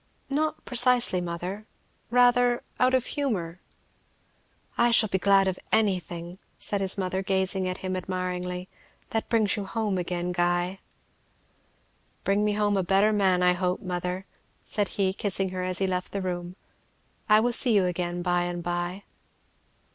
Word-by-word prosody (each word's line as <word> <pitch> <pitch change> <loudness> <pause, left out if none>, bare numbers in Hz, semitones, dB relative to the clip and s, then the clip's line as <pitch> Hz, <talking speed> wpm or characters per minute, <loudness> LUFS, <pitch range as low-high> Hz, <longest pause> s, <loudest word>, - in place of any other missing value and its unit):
"Not 310 +2 -1
precisely, 245 -6 +3
mother, 180 +5 -5 0.4
rather 245 0 +4 0.2
out 255 +1 +4
of 255 -1 +1
humour." 185 - -2 1.1
"I 235 0 +3
shall 230 -2 +4
be 190 - 0
glad 195 +1 +4
of 185 -1 -2
anything," 180 -4 0 0.2
said 200 -1 -3
his 190 0 +1
mother, 185 0 -1
gazing 190 -1 0
at 185 0 -2
him 185 0 -1
admiringly, 180 0 -3 0.4
"that 225 - -2
brings 220 -3 +2
you 205 - -4
home 210 -2 -1
again, 175 0 -2
Guy." 175 +1 0 1.4
"Bring 200 +1 +2
me 210 0 +1
home 205 -1 +1
a 190 - +1
better 195 +4 +3
man, 190 -3 +3
I 180 0 +5
hope, 180 0 -1
mother," 180 +1 -3 0.4
said 205 -2 -1
he 190 -2 +2
kissing 195 -1 -1
her 185 0 -4
as 180 0 -1
he 195 - +1
left 185 -1 -2
the 200 - -2
room. 175 -1 -4 0.7
"I 215 0 +7
will 240 +2 +1
see 240 -1 +3
you 195 -2 +4
again 175 0 -2
by 175 -1 +1
and 175 -1 -4
by." 175 +2 -3
190 Hz, 155 wpm, -26 LUFS, 180-210 Hz, 1.4 s, I